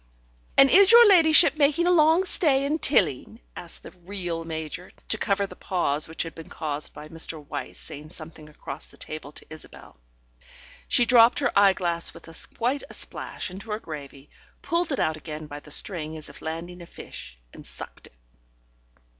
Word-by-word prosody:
"And 275 - +8
is 390 +1 +7
your 470 0 +9
ladyship 320 -5 +6
making 300 +3 +3
a 355 - +3
long 325 +1 +4
stay 280 -6 +2
in 305 +3 -1
Tilling?" 170 - +1 0.2
asked - - -10
the - - -11
(real) 175 -2 -6
Major, 160 +2 -6 0.2
to 220 - +3
cover 200 0 0
the - - -11
pause 155 -5 -1
which 160 - -3
had 165 - -8
been 165 - -11
caused 150 -2 -4
by 150 +1 -9
Mr. 165 0 0
Wyse - - -6
saying 150 +2 -9
something 155 -2 -11
across 150 0 -7
the - - -17
table 155 -2 -8
to - - -10
Isabel. 155 - -12 0.9
She 240 - +4
dropped 235 0 +6
her 280 - +1
eyeglass 185 -4 +2
with 165 - -14 0.3
quite 250 +5 0
a - - -6
splash - - -4
into 195 +4 -10
her 210 0 -2
gravy, 140 -5 -10 0.3
pulled 340 -1 -1
it 275 - -1
out 155 0 0
again 155 0 -7
by 145 -1 -8
the 150 - -16
string 160 -1 0
as 155 - -9
if - - -12
landing 170 +3 -6
a 170 - -11
fish, - - -10 0.2
and - - -12
sucked - - -8
it. - - -24
175 Hz, 180 wpm, -25 LUFS, -, 0.9 s, your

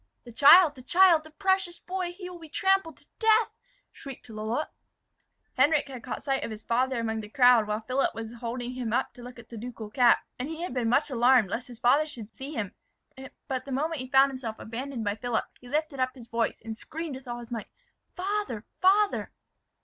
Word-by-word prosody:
"The 240 - -11
child, 295 +7 +8
the 260 - -13
child! 345 +3 +5
the - - -11
precious 380 +1 0
boy! 365 -1 -3
he 360 +1 -9
will 360 -1 -9
be 320 -2 -12
trampled 385 -1 +1
to - - -20
death!" 445 0 +4 0.4
shrieked 270 -3 -11
Lalotte. 220 +7 -3 0.9
Henric 290 +1 +3
had 255 -3 -8
caught - - -6
sight 270 -1 0
of - - -3
his 215 -1 -8
father 255 +1 0
among 220 -1 -2
the 210 - -10
crowd 245 -3 +5
while 210 +1 -2
Philip 255 +5 0
was 225 0 -6
holding 240 +1 -5
him 245 -3 -3
up - - 0
to 245 - -13
look 245 +1 -10
at 235 -1 -14
the 230 - -8
ducal 225 -2 -7
cap, 245 0 +4
and 255 +4 -3
he 325 +1 -5
had 355 - -4
been 245 -3 0
much 275 +4 +2
alarmed 240 -4 +4
lest 250 +3 -3
his 245 -2 -11
father 275 +6 +3
should 230 -8 -9
see 275 +2 -7
him. 215 -10 -4 0.7
But 260 -1 -3
the 275 - -8
moment 300 +2 -1
he 255 - -7
found 270 0 +5
himself 240 -4 -6
abandoned 240 +2 -5
by 205 -1 0
Philip, 235 +1 -2
he 250 - -14
lifted 300 0 -1
up 255 +1 0
his 240 -3 -12
voice, 230 -1 -1
and 225 -1 -5
screamed 320 +6 -6
with 265 -1 -11
all 240 0 -4
his 240 0 -10
might, 225 -3 -4 0.5
"Father, 380 - -3 0.2
father!" 400 +2 +3
255 Hz, 215 wpm, -28 LUFS, 235-310 Hz, 0.9 s, child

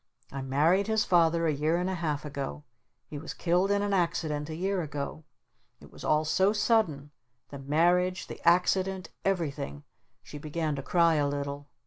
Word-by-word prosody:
"I 135 - -5
married 155 +10 +2
his 220 -1 +1
Father 170 -1 +3
a 155 - +2
year 155 +4 +1
and 180 +1 -1
a 190 - -1
half 155 -4 -2
ago. 135 - -5 0.4
He 145 - -7
was 160 - -7
killed 180 +3 +1
in 200 0 +2
an 205 -1 -1
accident 165 -4 -1
a 155 - -4
year 190 +2 -1
ago. 150 0 -5 0.5
It - - -16
was - - -12
all 155 +1 +2
so 190 +6 +3
sudden, 190 -10 +1 0.4
the 140 - -8
marriage, 175 +6 +2
the - - -9
accident, 185 +2 +2
everything 140 - -2 0.2
!" - - -46
She 150 - -9
began 155 0 -2
to 135 - -4
cry 165 +2 +3
a 145 -1 +2
little. 140 0 -4
160 Hz, 180 wpm, -29 LUFS, 145-180 Hz, 0.5 s, Father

